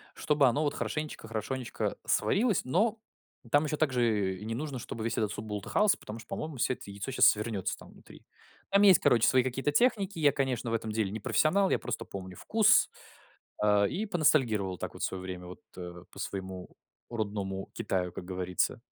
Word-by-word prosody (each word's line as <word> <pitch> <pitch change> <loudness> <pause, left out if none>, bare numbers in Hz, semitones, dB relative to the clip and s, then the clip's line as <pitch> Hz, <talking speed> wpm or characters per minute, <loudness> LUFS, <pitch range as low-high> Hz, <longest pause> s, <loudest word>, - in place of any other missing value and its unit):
чтобы 150 -2 +3
оно 140 +6 +2
вот 145 - 0
хорошенечко 150 -7 -4
хорошенечко 115 +3 -3
сварилось, 210 - +2
но 215 - +1 0.5
там 145 +2 +4
еще 150 0 -2
также 115 -10 +1
не 115 +1 -3
нужно, 140 -2 -4
чтоб 115 - -7
весь 115 +1 -2
этот 105 -2 0
суп 105 - -6
бултыхался, 105 - +1
потому 105 +2 -8
что, 115 - -13
по-моему, 155 -4 -5
всё 130 - +1
это 100 - -11
яйцо 100 +5 -5
щас 130 - +5
свернется 105 -2 0
там - - -14
внутри. - - -16 0.4
Там 200 +1 +4
есть, 195 -3 +8
короче, 115 -2 +4
свои 130 -2 +4
какие-то 135 +3 -1
техники. 200 - +2
Я, 145 -3 +4
конечно, 130 -4 -1
в - - -1
этом 110 -1 -2
деле 105 -3 -1
не 110 - -4
профессионал, 185 - +2
я - - +3
просто - - -4
помню 95 -2 -8
вкус. 220 -1 +4 0.7
А, 105 -1 +4
и 200 - -2
поностальгировал 130 - +2
так - - -5
вот - - -6
в - - +4
свое 95 -1 -4
время 90 -1 -7
вот, 90 - -10 0.2
э, 90 0 -8
по - - -12
своему 95 -2 -5 0.4
родному 100 -4 -3
Китаю, 90 -2 -2
как 90 - -8
говорится. 90 -1 -1
115 Hz, 190 wpm, -30 LUFS, 100-150 Hz, 0.7 s, есть